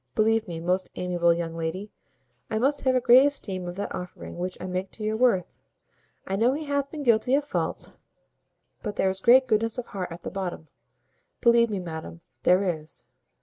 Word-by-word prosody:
Believe 220 0 +2
me, 170 -2 -5
most 180 +3 -1
amiable 175 -1 +1
young 170 -1 -2
lady, 170 +5 -4 0.6
I 220 - -1
must 275 +5 +1
have 260 -1 +2
a - - +4
great 250 +2 +7
esteem 200 -11 -2
of 175 - -5
that 200 - -4
offering 180 -1 -7
which 180 +1 -3
I - - -6
make 185 +1 -3
to 215 - -7
your 215 +1 0
worth. 220 -6 +1 0.7
I 195 - -2
know 235 +6 +3
he 305 +3 -3
hath 285 -1 -1
been 300 -2 -6
guilty 240 +1 +3
of 290 0 0
faults; - - -3 0.9
but 210 -3 -4
there 190 - +2
is 190 0 -5
great 255 +4 +6
goodness 225 -1 +1
of 250 - -3
heart 185 -5 -5
at 170 +1 -9
the - - -5
bottom. 180 -5 -5 0.7
Believe 235 -1 +5
me, 205 - -2
madam, 165 -2 -7 0.2
there 180 +2 +4 0.2
is." 155 - -10
200 Hz, 195 wpm, -26 LUFS, 180-240 Hz, 0.9 s, great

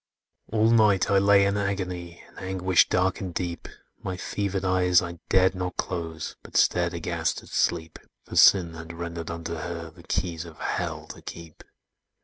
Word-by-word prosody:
"All 110 +1 +3
night 105 -5 +4
I 100 - +5
lay 100 0 +5
in 100 +1 +1
agony, 90 -4 -3
In - - -14
anguish 95 -1 +2
dark 95 0 +1
and 95 -2 -4
deep, 85 0 -4 0.3
My 95 -1 -4
fevered 100 0 -2
eyes 90 -1 +4
I 85 -1 -6
dared 95 0 +4
not 90 -1 -4
close, 80 -3 -4
But - - -4
stared 85 0 +3
aghast 85 - -2
at - - -15
Sleep: 80 -2 0 0.2
For - - -9
Sin 90 -4 +6
had 80 +1 -8
rendered 85 -1 -5
unto 85 0 -5
her 85 0 -5
The 85 +2 -16
keys 85 -1 -2
of 80 -3 -12
Hell - - -3
to - - -9
keep! 85 -2 -10
90 Hz, 170 wpm, -26 LUFS, 85-95 Hz, 0.3 s, Sin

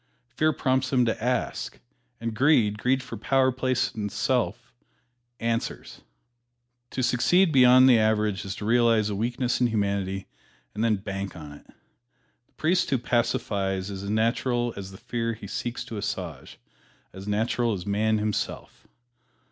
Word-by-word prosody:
Fear 155 0 +1
prompts 130 -1 0
him 125 -2 +3
to 110 -1 -2
ask, 125 +1 -2 0.4
and 115 -1 -3
Greed 115 -5 +3
greed 130 +3 +1
for - - -7
power, 135 -1 +2
place 130 0 0
and 105 -2 -3
pelf 120 -1 -1 0.7
answers. 115 0 -3 0.9
To 130 - -3
succeed 175 +9 +3
beyond 130 -1 +7
the 120 -3 +6
average 105 -3 +1
is 95 - -5
to 105 - -6
realize 115 -2 +3
a - - -2
weakness 120 +4 -1
in 125 - +4
humanity 100 -3 -1 0.5
and 105 - -2
then 115 -2 +3
bank 95 -1 -5
on 75 -3 -9
it. 75 - -14 0.8
The - - -39
priest 175 +3 +1
who 135 - +2
pacifies 100 -5 -1
is 95 -1 -6
as 100 - -5
natural 120 +2 0
as 95 -1 -7
the 95 - -11
fear 115 0 -3
he 105 - -10
seeks 120 +4 -4
to 110 - -7
assuage 100 - -5 0.6
as 95 +2 -9
natural 115 +2 0
as 90 -3 -5
man 110 +2 +1
himself. 105 0 -4
115 Hz, 155 wpm, -26 LUFS, 105-125 Hz, 0.9 s, beyond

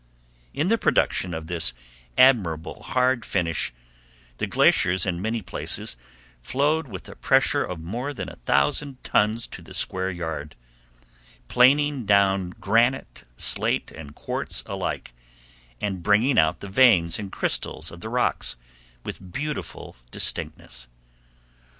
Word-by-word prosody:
In 155 +6 -1
the 230 0 +2
production 90 - +1
of 80 0 -6
this 85 -5 0 0.4
admirable 100 - +3
hard 125 +2 +1
finish, 85 - -1 0.7
the - - -1
glaciers 90 0 +3
in 90 -2 -2
many 110 +1 -2
places 80 -6 -2 0.5
flowed 145 - 0
with 95 -6 -8
a - - -10
pressure - - +2
of 90 -2 -5
more 115 - -4
than 140 - -6
a - - -10
thousand 125 - 0
tons 110 +2 +1
to - - -9
the - - -10
square 95 0 0
yard, 80 -5 -5 0.9
planing 140 +1 +4
down 100 -2 +3
granite, 115 +6 +1
slate, - - +1
and 75 -2 -11
quartz - - -2
alike, - - -4 0.7
and 95 -3 -3
bringing 105 +8 +3
out 80 +2 +2
the 100 - -6
veins 95 -6 +4
and 100 -2 -6
crystals - - -2
of 85 - -11
the 110 - -6
rocks 125 - 0 0.5
with 95 -2 -8
beautiful 150 +7 -5
distinctness. - - -3
100 Hz, 130 wpm, -24 LUFS, 85-125 Hz, 0.9 s, planing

